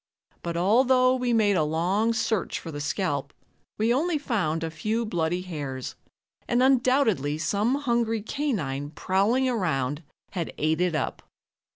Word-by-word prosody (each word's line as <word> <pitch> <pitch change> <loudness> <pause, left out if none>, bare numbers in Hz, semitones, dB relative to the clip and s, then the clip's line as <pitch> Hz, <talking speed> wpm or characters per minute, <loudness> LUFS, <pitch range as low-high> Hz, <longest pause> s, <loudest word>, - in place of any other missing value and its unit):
But 170 -1 -3
although 255 +7 +4
we 250 -1 -1
made 215 -3 +3
a 170 - +3
long 180 +9 +1
search 220 -3 -1
for 165 - -8
the 145 -1 -5
scalp, 145 -2 -2 0.5
we 225 +2 +2
only 315 +5 +1
found 185 - -1
a 165 - -3
few 215 +9 -1
bloody 175 -2 -1
hairs, 145 -7 -5 0.5
and 240 +1 +2
undoubtedly 250 - +3
some 205 +10 +1
hungry 235 -5 0
canine 175 - -2
prowling 200 - +1
around 155 - -1 0.3
had 175 -4 -4
ate 155 +2 +1
it 180 -3 +1
up. 150 - -2
195 Hz, 145 wpm, -26 LUFS, 155-240 Hz, 0.5 s, although